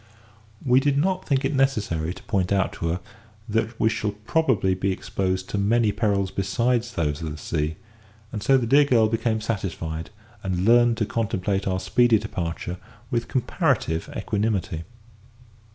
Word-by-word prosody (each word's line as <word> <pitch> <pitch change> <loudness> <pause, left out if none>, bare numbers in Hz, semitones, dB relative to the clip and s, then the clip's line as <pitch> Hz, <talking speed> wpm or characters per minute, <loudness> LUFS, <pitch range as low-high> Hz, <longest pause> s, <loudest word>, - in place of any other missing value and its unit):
We 125 0 +5
did 140 0 +1
not 185 +5 0
think 135 -2 +1
it 140 - 0
necessary 105 - +1
to - - -10
point 95 -4 0
out 95 -1 +1
to 85 - -3
her 85 +2 -1 0.5
that 110 +1 -1
we - - +3
should 105 -1 -2
probably 115 - +2
be 95 +1 0
exposed 95 0 -2
to 100 - -1
many 110 +2 +3
perils 100 -3 0
besides 120 +5 0
those 75 -2 -1
of 80 - -3
the 75 - -6
sea; 75 +2 -2 0.6
and 105 - -4
so 135 +5 +4
the 125 - 0
dear 140 +5 +5
girl 115 -5 +4
became 110 0 0
satisfied, 85 -7 -3 0.3
and 95 -1 -1
learned 120 0 +5
to 110 - +1
contemplate 100 -3 -1
our 95 -1 0
speedy 120 +3 +4
departure 85 -2 -4 0.3
with 115 -1 0
comparative 80 -9 0
equanimity. 100 -6 -1
105 Hz, 160 wpm, -24 LUFS, 95-120 Hz, 0.6 s, We